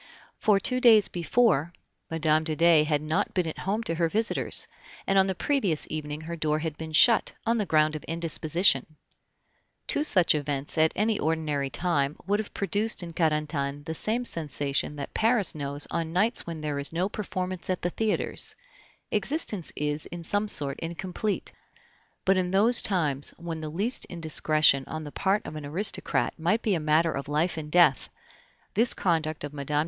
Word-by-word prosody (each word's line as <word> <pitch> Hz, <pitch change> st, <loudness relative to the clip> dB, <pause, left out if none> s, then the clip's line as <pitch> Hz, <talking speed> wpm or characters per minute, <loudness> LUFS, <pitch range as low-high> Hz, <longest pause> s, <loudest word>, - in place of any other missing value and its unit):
For 210 Hz, -2 st, +3 dB
two 255 Hz, +4 st, 0 dB
days 220 Hz, -5 st, +6 dB
before 175 Hz, -, +1 dB, 0.4 s
Mme. 155 Hz, -1 st, +2 dB
de 155 Hz, -1 st, -1 dB
Dey 165 Hz, -1 st, +5 dB
had 150 Hz, -1 st, 0 dB
not 155 Hz, +1 st, -1 dB
been 180 Hz, -2 st, +1 dB
at 160 Hz, -, -6 dB
home 210 Hz, +4 st, -2 dB
to 165 Hz, -, -2 dB
her 165 Hz, 0 st, 0 dB
visitors, 220 Hz, +5 st, 0 dB, 0.4 s
and 195 Hz, 0 st, +3 dB
on 190 Hz, -, +3 dB
the 190 Hz, -, -2 dB
previous 205 Hz, -, 0 dB
evening 150 Hz, -1 st, -5 dB
her 165 Hz, +2 st, -6 dB
door 155 Hz, -2 st, 0 dB
had 155 Hz, -1 st, -4 dB
been 160 Hz, 0 st, -7 dB
shut, 155 Hz, +10 st, +5 dB
on 230 Hz, +1 st, +1 dB
the 205 Hz, -, -1 dB
ground 155 Hz, 0 st, +2 dB
of 155 Hz, -, -6 dB
indisposition. 165 Hz, -2 st, +1 dB, 0.9 s
Two 295 Hz, -, 0 dB
such 185 Hz, -, +5 dB
events 145 Hz, -2 st, -2 dB
at 160 Hz, 0 st, +3 dB
any 215 Hz, +1 st, 0 dB
ordinary 150 Hz, -3 st, -1 dB
time 145 Hz, -3 st, 0 dB
would 205 Hz, +2 st, +1 dB
have 215 Hz, -, -5 dB
produced 205 Hz, 0 st, 0 dB
in 170 Hz, -1 st, -8 dB
Carentan 150 Hz, -3 st, -1 dB
the 160 Hz, +1 st, -5 dB
same 225 Hz, +9 st, 0 dB
sensation 145 Hz, -, -2 dB
that 140 Hz, -1 st, -7 dB
Paris 220 Hz, -4 st, +2 dB
knows 145 Hz, -1 st, -4 dB
on 165 Hz, -1 st, -2 dB
nights 205 Hz, +6 st, 0 dB
when 165 Hz, -2 st, -5 dB
there 150 Hz, -2 st, -3 dB
is 140 Hz, -, -1 dB
no 175 Hz, +3 st, 0 dB
performance 185 Hz, -3 st, -5 dB
at 185 Hz, -, -2 dB
the 175 Hz, -, 0 dB
theaters 220 Hz, +2 st, -1 dB, 0.6 s
existence 225 Hz, -, +1 dB
is 150 Hz, +1 st, -1 dB
in 175 Hz, 0 st, -8 dB
some 205 Hz, +5 st, 0 dB
sort 140 Hz, -7 st, 0 dB
incomplete; 180 Hz, +5 st, -4 dB, 0.7 s
but 190 Hz, 0 st, +3 dB
in 180 Hz, -1 st, 0 dB
those 210 Hz, +6 st, +3 dB
times 150 Hz, -8 st, 0 dB
when 170 Hz, -1 st, -6 dB
the 155 Hz, -1 st, -5 dB
least 205 Hz, +11 st, 0 dB
indiscretion 155 Hz, -4 st, +2 dB
on 155 Hz, 0 st, -5 dB
the 145 Hz, -, -8 dB
part 200 Hz, +6 st, 0 dB
of 155 Hz, -, -7 dB
an 155 Hz, -, -6 dB
aristocrat 170 Hz, +9 st, -1 dB
might 175 Hz, +8 st, 0 dB
be 210 Hz, -, +1 dB
a 170 Hz, -, 0 dB
matter 155 Hz, +2 st, +2 dB
of 140 Hz, -1 st, -5 dB
life 155 Hz, +4 st, 0 dB
and 155 Hz, -2 st, -6 dB
death, 170 Hz, -6 st, +4 dB, 0.6 s
this 230 Hz, +4 st, +2 dB
conduct 160 Hz, -4 st, -1 dB
of 145 Hz, 0 st, -6 dB
Mme. 140 Hz, 0 st, -6 dB
165 Hz, 180 wpm, -27 LUFS, 150-195 Hz, 0.9 s, days